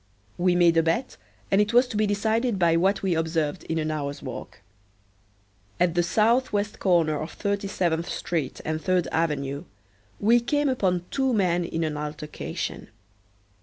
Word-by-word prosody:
We 180 0 +3
made 170 -2 +4
a - - +6
bet 165 +11 -1 0.4
and 195 +1 +5
it 210 +2 0
was 245 +2 +5
to 225 - -6
be 215 0 +2
decided 220 +3 0
by 170 -2 +3
what 195 +4 +2
we 190 -2 +1
observed 160 0 -1
in 165 - -2
an 155 -1 -1
hour's 145 -2 -4
walk. 130 -3 -8 1.2
At 180 -2 +3
the 175 - +3
southwest 210 +2 +1
corner 165 -5 +2
of 155 - -6
Thirty 200 -1 -2
seventh 170 -3 -1
street 155 -7 -3
and 155 0 -2
Third 185 -1 +1
avenue, 145 -4 -1 0.5
we 230 +4 +5
came 290 +4 0
upon 185 -8 0
two 265 -3 +1
men 180 -4 +2
in 165 -1 -2
an 155 -2 -2
altercation. 150 0 -5
175 Hz, 165 wpm, -25 LUFS, 160-205 Hz, 1.2 s, a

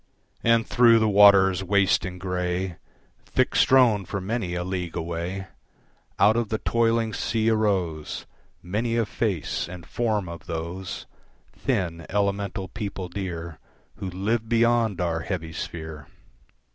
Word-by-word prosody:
And 115 -1 +4
through 120 -2 +5
the 110 -1 +3
waters 100 -2 +6
waste 100 -1 +2
and 90 -1 -6
grey, 90 -1 -2 0.5
Thick - - +1
strown 120 -6 +5
for 100 - -3
many 95 -2 -2
a 90 - -2
league 90 -2 -4
away, 85 +3 -3 0.7
Out 105 +3 +5
of 115 -3 0
the 110 - 0
toiling 115 -1 +1
sea 115 +1 0
arose 95 -8 -1 0.4
Many 115 +6 -1
a 115 - +2
face 100 -7 -2
and 90 -2 -9
form 110 -5 -1
of 85 -1 -9
those 85 +3 -5 0.5
Thin, 85 -4 -2
elemental 100 -1 -1
people 100 -4 -5
dear 85 -4 -5 0.4
Who 95 - -4
live 110 +5 -1
beyond 115 -3 +2
our 85 -2 0
heavy 80 -2 -4
sphere. 80 -3 -6
95 Hz, 135 wpm, -25 LUFS, 90-110 Hz, 0.7 s, waters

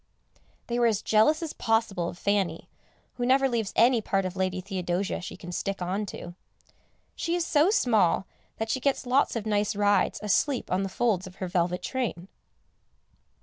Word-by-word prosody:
They 240 0 -2
were 240 - +4
as 215 -3 0
jealous 260 +10 +3
as 320 - -4
possible 225 -6 0
of 175 - -9
Fanny, 195 -4 -1 0.5
who 245 - -2
never 270 +1 +4
leaves 230 -5 -1
any 235 0 +5
part 195 -2 0
of 185 0 -4
Lady 185 0 -1
Theodosia 185 0 -2
she - - -7
can 175 - -9
stick 195 +2 -3
on 190 +4 -2
to. 175 -2 -8 0.8
She 335 +1 -1
is 350 -1 0
so 305 +3 +3
small 215 - +2 0.3
that 220 0 -2
she 260 - 0
gets 275 0 0
lots 255 +2 +2
of 225 -2 -3
nice 210 -1 0
rides 205 0 +2
asleep 235 +6 0
on 185 +1 +1
the 195 - -2
folds 195 -3 0
of 185 - -12
her 185 - -4
velvet 175 0 0
train. 225 -8 -3
205 Hz, 180 wpm, -27 LUFS, 185-240 Hz, 0.8 s, any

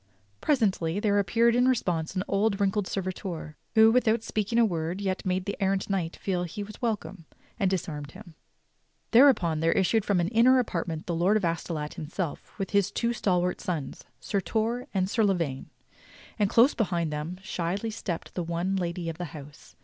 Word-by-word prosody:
Presently 200 - +1
there 205 -1 +2
appeared 230 +5 +3
in 250 +1 +4
response 180 -9 0
an 185 - 0
old 200 +2 +2
and 195 - -6
wrinkled 200 0 +1
servitor, 185 -4 -4 0.2
who, 220 0 +7
without 225 -2 +2
speaking 215 +1 -1
a 235 - +6
word 170 -1 -2
yet 190 -2 -2
made 185 0 0
the 200 - -3
errant 195 +1 0
knight 175 -4 -1
feel 185 -3 -2
that 175 -2 -5
he 205 - -4
was 210 +1 -11
welcome, 205 -7 -3 0.3
and 195 -3 +2
disarmed 150 -6 -3
him. 185 -4 -12 0.8
Thereupon 225 - +5
there 165 +1 +2
issued 200 +3 +2
from 200 -3 +1
an 175 +1 +1
inner 240 +4 +5
apartment 170 -9 -2
the 175 - -2
Lord 180 +6 +3
of 205 - -1
Astolat 165 -2 -3
himself 160 +1 -5
with 195 -2 -4
his 200 -2 +3
two 235 0 0
stal 190 -6 +1
wart 180 +1 -2
sons. 165 -6 -4 0.2
Sir 200 -2 -1
Torre 230 +5 -1
and 185 -2 0
Sir 220 +3 +1
La 195 -2 +3
vaine; 140 -7 -3 0.7
and 205 -2 +3
close 240 +7 +5
behind 175 -7 -1
them 155 +4 -4
shyly 195 +3 -2
stepped 185 -5 -5
the 180 - -2
one 170 +3 -1
lady 175 -2 -2
of 165 +1 -5
the 175 - -2
house. 145 0 -13
190 Hz, 195 wpm, -27 LUFS, 170-215 Hz, 0.8 s, who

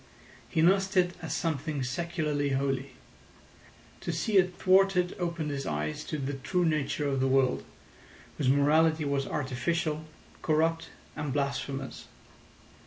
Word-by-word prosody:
He 160 - +1
nursed 195 +2 +3
it 180 -1 +4
as 160 -4 -5
something 155 -3 -1
secularly 150 0 -1
holy. 135 -1 -1 1.0
To - - -3
see 195 +6 +1
it 185 -1 +3
thwarted 190 -1 +3
opened 170 -4 -2
his 140 -1 -3
eyes 75 0 -2
to 155 - -3
the 140 0 -3
true 175 +6 0
nature 150 -2 0
of 135 -1 0
the 135 - +2
world, 130 -1 +2 0.8
whose 135 -4 +2
morality 155 +3 +4
was 140 -1 0
artificial, 150 +3 -1 0.4
corrupt, 165 +1 +1 0.3
and 150 -2 -3
blasphemous. 140 -1 -3
150 Hz, 130 wpm, -29 LUFS, 135-170 Hz, 1.0 s, it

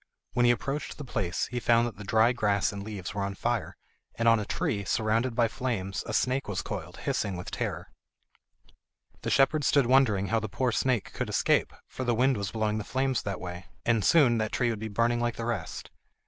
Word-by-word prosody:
When 120 -1 +3
he - - +7
approached 135 +4 -3
the 150 - -6
place 95 -7 -1
he 125 - -1
found 120 0 +3
that 120 - -5
the 105 - -8
dry 110 +4 +4
grass 105 -5 +1
and 100 -1 -6
leaves 100 -3 -6
were 100 - -3
on 100 0 -3
fire, 120 +1 -2 0.4
and 115 - 0
on 115 -1 +6
a 105 - -3
tree, 100 0 -1
surrounded 115 +4 0
by 120 -1 +3
flames, 105 -5 -3
a - - -3
snake 130 +4 +1
was 100 -3 -2
coiled, - - -6
hissing 100 -3 -1
with 90 - -7
terror. - - -4 1.3
The - - -3
shepherd 145 +2 +3
stood 140 -1 +4
wondering 115 -7 +3
how 115 - +2
the 110 -1 -5
poor 125 +4 0
snake 125 -2 0
could - - -3
escape, - - +2 0.2
for 130 - -5
the 120 -2 +1
wind 130 +3 +3
was 100 -2 -3
blowing 110 0 -1
the - - -4
flames 130 +2 0
that 100 -2 -4
way, 90 0 -7 0.2
and 115 -3 +2
soon 125 - +5
that 110 -1 -1
tree 120 -2 +1
would 110 - -4
be 110 - -4
burning 115 +3 +1
like 120 0 -1
the 115 - -4
rest. 110 -9 -4
115 Hz, 220 wpm, -28 LUFS, 100-125 Hz, 1.3 s, he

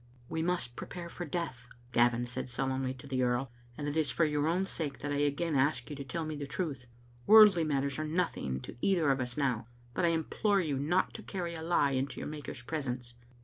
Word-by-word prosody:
"We 160 - -1
must 165 -8 -1
prepare 170 -1 -6
for 175 - -6
death/* 145 -7 -4 0.2
Gavin 120 0 +3
said 120 +1 -4
solemnly 130 +1 -1
to 130 - -12
the 130 -2 -1
earl, 125 0 +1 0.3
and 145 - -3
it 145 - -2
is 155 -3 +2
for 165 +5 +2
your 150 0 +1
own 180 +4 +2
sake 150 -7 -2
that 145 - -3
I 145 - 0
again 145 +3 +1
ask 140 +3 +2
yon 150 - -6
to 140 - -5
tell 165 +4 -3
me 155 0 -4
the 145 -1 -5
truth. 140 -5 -3 0.4
Worldly 210 -5 +9
matters 140 -2 0
are - - 0
nothing 155 - -1
to - - -9
either 170 -7 +3
of 135 -1 +1
us 125 -1 -3
now, 125 -6 0 0.3
but - - -1
I - - +5
implore 170 +5 +1
you 150 -7 0
not 170 +7 +1
to - - -7
carry 175 -3 -4
a 160 - -6
lie 160 -4 +2
into 135 +1 -1
your - - -4
Maker's 145 -5 -7
presence." 125 -4 -4
145 Hz, 225 wpm, -32 LUFS, 130-165 Hz, 0.4 s, Worldly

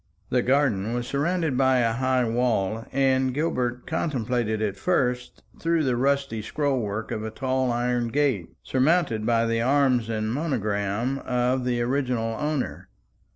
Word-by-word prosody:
The 125 - +3
garden 120 -5 +1
was 120 0 -2
surrounded 155 +2 0
by 130 0 +3
a 115 -2 +2
high 130 0 +1
wall, 115 -2 0
and 130 -1 +2
Gilbert 125 -5 -1
contemplated 125 -8 -1
it 105 -3 -1
first 125 - -1 0.2
through 165 -1 +1
the 130 -3 +1
rusty 135 -3 0
scroll 140 +4 -1
work 110 0 -4
of 110 - -3
a 110 - -3
tall 130 +2 -1
iron 120 0 0
gate, 130 - 0
surmounted 130 -5 +1
by 115 -1 +3
the 115 0 0
arms 130 -3 +2
and 110 0 -1
monogram 115 -3 -1
of 125 0 0
the 120 -1 0
original 125 -3 -1
owner. 150 -2 -3
125 Hz, 150 wpm, -25 LUFS, 115-135 Hz, 0.2 s, The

